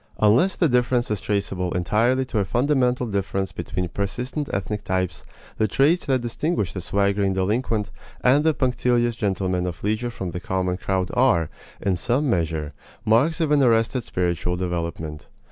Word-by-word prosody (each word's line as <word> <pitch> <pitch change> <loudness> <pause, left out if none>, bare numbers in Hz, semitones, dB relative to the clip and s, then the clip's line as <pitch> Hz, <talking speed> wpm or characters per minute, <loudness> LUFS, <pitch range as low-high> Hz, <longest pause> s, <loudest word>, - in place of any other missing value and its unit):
Unless 115 - +4
the 170 - +3
difference 125 -2 +1
is 105 - -1
traceable 95 -3 -1
entirely 115 +9 +1
to 120 -4 -2
a - - +2
fundamental 125 +2 +1
difference 100 -2 -2
between 90 +1 -3
persistent 125 - -3
ethnic 100 +2 -3
types, 95 -2 -2 0.4
the 110 - +3
traits 145 - +2
that 130 -2 +2
distinguish 120 - -1
the 95 - -4
swaggering 100 +1 +1
delinquent 105 +1 0 0.3
and 135 +4 +4
the 160 -1 +3
punctilious 120 -2 +1
gentleman 95 -4 -1
of 85 -3 -6
leisure 110 +4 0
from 95 -6 -5
the 90 - -4
common 90 0 -1
crowd 95 -1 -1
are, 120 - +3 0.3
in 95 -2 0
some 125 - 0
measure, 80 -4 -1 0.3
marks 130 +10 +3
of 160 -3 +1
an 145 -1 +4
arrested 115 0 +2
spiritual 90 -1 -1
development. 85 -4 -4
105 Hz, 160 wpm, -23 LUFS, 90-125 Hz, 0.4 s, Unless